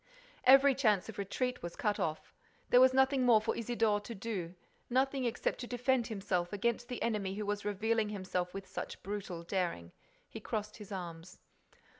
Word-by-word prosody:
Every 270 +2 +8
chance 220 -7 +2
of 220 - -8
retreat 250 +6 -2
was 170 0 -6
cut 210 -2 0
off. 160 -4 -3 0.4
There 250 - +8
was 260 0 +7
nothing 265 0 +3
more 235 -3 +6
for 220 - -2
Isidore 225 -2 +1
to 230 +2 -8
do, 190 -4 -4 0.3
nothing 265 +1 +1
except 235 - -1
to 245 - -5
defend 245 0 +1
himself 190 -5 -2
against 235 +4 -1
the 245 -1 -4
enemy 205 -4 -1
who 210 0 -3
was 205 0 -2
revealing 215 +2 0
himself 185 -3 -3
with 195 +1 -7
such - - -7
brutal 195 -4 -5
daring. 170 - -2 0.4
He - - -8
crossed 210 0 -4
his 210 -2 -11
arms. 175 -2 -7
210 Hz, 175 wpm, -33 LUFS, 190-245 Hz, 0.4 s, Every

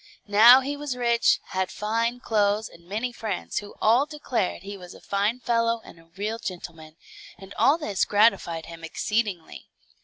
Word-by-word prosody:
Now 225 +5 +8
he 280 +2 -3
was 285 -3 -5
rich, 235 -1 +2
had 185 -1 -1
fine 230 +3 -2
clothes, 210 -2 +1
and 170 0 -18
many 225 +5 -2
friends, 220 -5 -4
who 205 0 -11
all 240 +6 +3
declared 255 - -3
he 200 +1 -7
was 180 -2 -11
a - - -13
fine 205 +5 -1
fellow 230 -1 +1
and - - -14
a 165 - -20
real 215 +3 -3
gentleman, 170 -6 -8 0.4
and 195 +2 -12
all 290 +4 +3
this 210 - -1
gratified 205 -6 +2
him 165 -1 -11
exceedingly. 200 +1 -3
215 Hz, 165 wpm, -25 LUFS, 190-235 Hz, 0.4 s, Now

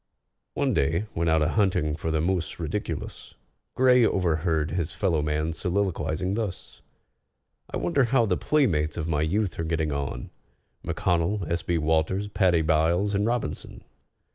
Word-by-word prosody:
One - - +1
day, 80 +8 +1
when 85 0 0
out 80 -1 +3
a - - +1
hunting 90 -8 +1
for 80 0 -4
the 80 -1 0
mus 90 -1 -1
ridiculus, 85 +5 -5 0.4
GRAY 125 -1 +5
overheard 80 -5 +1
his 85 -1 -2
fellow 85 -5 +1
man 75 +2 -1
soliloquizing 90 -1 -1
thus: 105 -4 -5 0.9
"I - - -3
wonder 140 -6 +2
how 120 0 +3
the 95 -4 +1
playmates 85 - +1
of 80 -1 -2
my 75 -2 0
youth 95 +5 -1
are - - 0
getting 80 -2 -1
on, 70 -4 -4 0.5
M'CONNELL, 90 +1 0
S. 85 - 0
B. 85 - -1
WALTERS, 80 +6 0
PADDY 90 -5 +2
BYLES, 80 +6 +2
and 100 +2 +1
ROBINSON?" 120 -1 -3
85 Hz, 150 wpm, -26 LUFS, 80-100 Hz, 0.9 s, GRAY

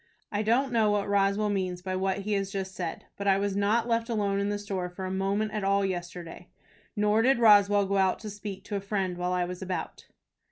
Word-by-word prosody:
I 205 - 0
don't 240 +5 +2
know 225 -3 +3
what 205 -1 0
Roswell 200 +1 +2
means 185 -2 -2
by 185 0 -2
what 190 +1 -1
he 210 +2 -2
has 195 -1 0
just 190 -1 -4
said, 175 -3 -5
but 200 - -3
I 195 -1 +5
was 200 0 -1
not 210 +4 +2
left 230 0 0
alone 200 -3 0
in 200 0 0
the 205 - -1
store 195 -3 -4
for 185 +2 -7
a 185 - -3
moment 200 +3 0
all 200 +1 +2
day 195 - 0
yesterday, 175 -1 -6 0.5
nor 210 +1 +3
did 260 +2 +4
Roswell 205 -3 +6
go 200 +1 0
out 190 -1 +3
to 215 - -6
speak 205 -1 -7
to 205 - -5
a 200 - -2
friend 195 -2 -2
while 180 0 -2
I 180 -1 +1
was 180 +1 -7
about." 185 -1 -5
200 Hz, 235 wpm, -28 LUFS, 190-210 Hz, 0.5 s, Roswell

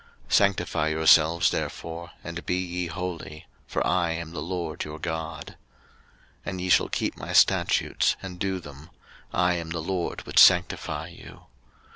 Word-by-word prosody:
03:020:007 - - -3
Sanctify 100 -5 +2
yourselves 80 +1 +4
therefore, 85 +1 -5
and 85 0 -6
be 90 - +1
ye 90 -1 -3
holy: 85 -3 -6 0.2
for - - -1
I 85 -2 +1
am 85 -1 -6
the 80 -3 -5
LORD 85 -1 -4
your 75 0 -7
God. 80 -1 -5
03:020:008 - - -11 0.9
And 95 -2 -4
ye 90 - -3
shall - - +4
keep - - -2
my - - -6
statutes, - - +3
and 90 -2 -8
do 95 -1 -1
them: 75 0 -12 0.4
I 90 0 +2
am 85 -2 -4
the 85 +1 -3
LORD 90 +1 -3
which - - +2
sanctify 80 +2 +4
you. 85 - -13
85 Hz, 160 wpm, -26 LUFS, 80-90 Hz, 0.9 s, yourselves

